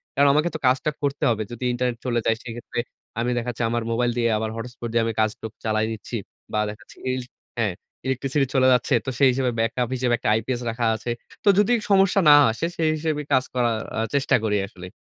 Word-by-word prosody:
কারণ 140 +1 +5
আমাকে 155 +4 +2
তো - - -3
কাজটা 130 +4 +2
করতে 140 +1 -1
হবে। 110 -2 0
যদি 120 +1 -7
ইন্টারনেট 120 -1 -1
চলে 120 -2 +1
যায়, 115 - +3
সেইক্ষেত্রে 120 0 -6 0.4
আমি 120 +1 0
দেখা 120 +1 -2
যাচ্ছে 120 0 -4
আমার 120 0 -1
মোবাইল 120 +1 +1
দিয়ে, 115 -1 +2
আবার 110 0 -2
হটস্পট 120 +1 -6
দিয়ে 115 0 +2
আমি 115 - -1
কাজটুক 110 0 -1
চালায় 110 0 +1
নিচ্ছি। 110 +2 -6 0.4
বা - - +1
দেখা 105 - -9
যাচ্ছে - - -17 0.2
ইলস 130 -1 -4 0.3
হ্যাঁ, 105 -5 +1 0.3
ইলেকট্রিসিটি 135 +1 0
চলে 130 -1 +5
যাচ্ছে, 125 +3 +1
তো - - -2
সেই 135 -2 +6
হিসেবে 125 0 0
ব্যাকআপ 115 +2 0
হিসেবে 125 -1 +1
একটা - - -1
আইপিএস 120 +3 -1
রাখা 115 +1 -1
আছে। 115 +2 -4 0.3
তো 205 - +5
যদি 210 +4 +4 0.2
সমস্যা 195 0 +4
না - - +10 0.2
আসে, 120 +9 -3
সেই 160 -1 +2
হিসেবে 155 -1 -1
কাজ 130 -1 +4
করার 120 -3 +1 0.2
আ - - 0 0.2
চেষ্টা 140 - +3
করি 105 -2 +1
আসলে। 90 -2 -11
120 Hz, 215 wpm, -24 LUFS, 115-135 Hz, 0.4 s, না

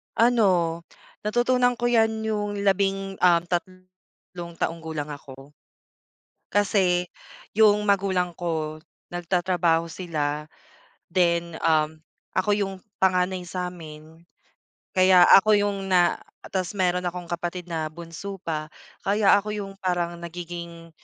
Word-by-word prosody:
Ano, 185 -8 +3 0.4
natutunan 245 +3 +2
ko 240 0 0
'yan 220 -2 +2
yung 205 -2 -2
labing, 195 0 0
um, 175 -2 +5
tat 175 0 -1 0.7
tatlong 170 -1 -3
gulang 155 -2 -5
ako. 140 -1 -10 1.0
Kasi 185 -3 +2 0.5
yung 210 -1 +5
magulang 190 -3 +1
ko 160 -3 -3 0.3
nagtatrabaho 175 -1 +1
sila 150 -4 -3 0.6
then, 170 -2 +1
um, 155 -1 +2 0.3
ako 205 +2 +2
yung 200 -2 -1 0.3
panganay 185 -1 +1
sa'min. 165 -3 -7 0.7
Kaya 185 -1 +7
ako 215 +2 +7
yung 200 -1 -1
na 175 -1 +4 0.3
tas 185 -2 -2
meron 180 -2 +1
akong 175 0 -4
kapatid 175 +1 -3
na 160 -2 -2
bunso 170 +4 -7
pa 155 -3 -3 0.4
kaya 200 0 +3
ako 210 +1 -4
yung 200 -2 -5
parang 175 -3 -1
nagiging 170 -1 -8
180 Hz, 110 wpm, -25 LUFS, 170-200 Hz, 1.0 s, Kaya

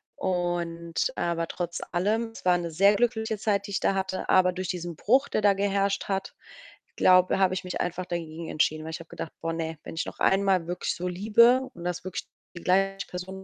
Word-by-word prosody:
Und 175 -2 -1
aber 170 -1 -1
trotz 175 -1 -4
allem, 215 +6 0
es - - -11
war 180 -1 +5
'ne 170 -1 -4
sehr 200 +5 +5
glückliche 220 -2 0
Zeit, 200 -1 0
die - - -8
ich 190 - 0
da - - +2
hatte, 190 -1 -3
aber 180 -1 +4
durch 185 0 -4
diesen 175 -2 -4
Bruch, 260 - +3
der - - 0
da 200 -1 +5
geherrscht 195 0 0
hat, 195 -1 -3 0.6
glaube 185 0 +5
habe 185 -1 +3
ich 185 - -3
mich 180 - -4
einfach 180 +1 -3
dagegen 165 -1 -5
entschieden. 155 0 +1
Weil 160 - -5
ich 160 - -5
habe 165 - -14
gedacht: 160 - -7
„Boah, 165 0 -2
ne, 160 -1 -4
wenn - - -8
ich - - -2
noch - - -8
einmal 190 -3 +3
wirklich 175 +1 -2
so 180 0 -4
liebe 235 +8 +4
und 170 - -9
das 180 0 -3
wirklich 185 0 -5 0.3
die - - -9
gleiche 195 +1 +1
Person 190 +1 -7
185 Hz, 215 wpm, -27 LUFS, 175-200 Hz, 0.6 s, war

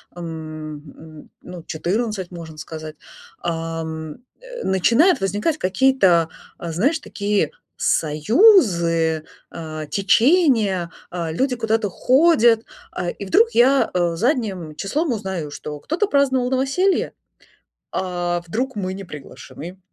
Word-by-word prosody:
м, 155 -2 -7
м, 155 +1 -14
ну, 180 -2 -10
14, 190 +4 -2
можно 160 -3 -9
сказать, 155 -1 -8 0.4
а, 165 -1 -3
м, 160 +6 -7 0.2
э, - - -8
начинают 230 - +3
возникать 210 - 0
какие-то, 185 -5 +3 0.3
э, 170 -1 -5
знаешь, 275 - +1
такие 205 -5 -1 0.3
союзы, 165 - +3 0.3
э, 155 -1 -6
течения. 215 - +3 0.2
Э, 170 -2 -3
люди 255 - 0
куда-то 225 -2 0
ходят, 245 - +4 0.3
а, 175 - -3
и 200 - -7
вдруг 455 - +4
я, 265 +3 +4
э, 175 -2 +1
задним 200 - -1
числом 280 - -1
узнаю, 190 -8 -4
что 150 0 -7
кто-то 345 - -1
праздновал 265 -5 +2
новоселье, 275 +9 +1 0.8
а 175 -2 -2
вдруг 250 +8 -3
мы 190 -2 -3
не 195 0 -7
приглашены. 170 +4 -10
190 Hz, 115 wpm, -21 LUFS, 165-255 Hz, 0.8 s, ходят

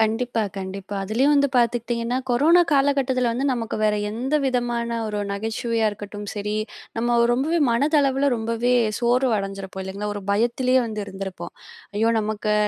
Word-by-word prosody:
கண்டிப்பா, 225 +1 +1
கண்டிப்பா, 195 +1 -6
அதிலேயும் 245 +9 +2
வந்து 280 -1 +4
பார்த்துக்கிட்டிங்கன்னா, 235 0 0
கொரோனா 315 +9 +5
காலகட்டத்தில 275 -3 +2
வந்து 250 +4 -2
நமக்கு 230 -3 -3
வேற 210 -1 +3 0.2
எந்த 250 +7 -2
விதமான 240 -2 -1
ஒரு 210 -1 -3
நகைச்சுவையா 225 +2 -1
இருக்கட்டும் 205 0 -8
சரி, 210 0 -3 0.4
நம்ம 240 +1 +2
ரொம்பவே 295 +8 +1
மனதளவில 280 +1 +2
ரொம்பவே 230 +2 0 0.3
சோர்வு 250 +2 +2
அடைஞ்சிருப்போம் 195 -1 -5
இல்லங்களா? 200 +2 -4
ஒரு 205 - -4
பயத்திலேயே 240 +5 +2
வந்து 215 -1 -4
இருந்திருப்போம். 190 -3 -7 0.4
ஐயோ 225 +2 +2
நமக்கு, 215 0 -1
235 Hz, 135 wpm, -23 LUFS, 210-255 Hz, 0.4 s, கொரோனா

